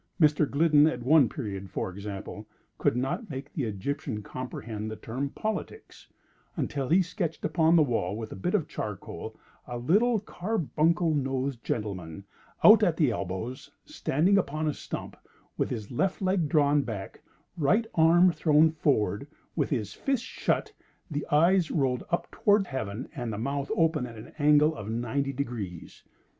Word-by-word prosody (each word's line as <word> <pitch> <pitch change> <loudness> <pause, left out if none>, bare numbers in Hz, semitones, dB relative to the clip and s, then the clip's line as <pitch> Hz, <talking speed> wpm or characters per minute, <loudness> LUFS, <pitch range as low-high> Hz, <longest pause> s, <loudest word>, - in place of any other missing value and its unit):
Mr. 150 -2 +4
Gliddon, 150 0 +5
at 125 - -6
one 140 -1 +5
period, 100 -7 -5
for 95 - -3
example, 100 +1 -7 0.3
could 120 - +2
not 135 - -2
make 140 0 -7
the 140 - -2
Egyptian 110 +2 -4
comprehend 110 -3 -6
the 110 - -5
term 130 +6 -4
"politics," 220 - -5 0.5
until 135 -3 -2
he 180 +4 +5
sketched 180 -2 -4
upon 165 -1 +3
the 160 - +6
wall, 110 -8 -1
with 110 -1 -6
a - - -6
bit 95 - -1
of - - 0
charcoal - - -6 0.3
a 120 - -4
little 210 - +3
carbuncle 170 - 0
nosed 135 -3 -2
gentleman, 95 -5 -4 0.4
out 220 +1 +9
at 175 -6 +2
elbows, 115 - -2 0.2
standing 195 - +2
upon 155 -3 -2
a 150 - +1
stump, - - -7 0.4
with - - -1
his 110 -3 -5
left 185 +10 0
leg 185 -5 +1
drawn 145 -1 +4
back, 110 -7 -6 0.3
right 185 +8 +2
arm 170 +3 +5
thrown 155 -1 +4
forward, 140 -6 0 0.3
with - - 0
his 110 -8 -2
fist 270 -3 -1
shut, - - -1 0.4
the 145 -1 -3
eyes 170 +3 +4
rolled 130 -5 0
up 170 - 0
toward 205 -1 +3
Heaven, 120 - -4
and 120 -4 -3
the 105 - -4
mouth 140 +4 -2
open 160 -6 +2
at 115 -2 -11
an 110 - -11
angle 150 +1 +5
of 105 0 -7
ninety 120 +5 -1
degrees. 115 -10 -6
140 Hz, 155 wpm, -28 LUFS, 115-165 Hz, 0.5 s, out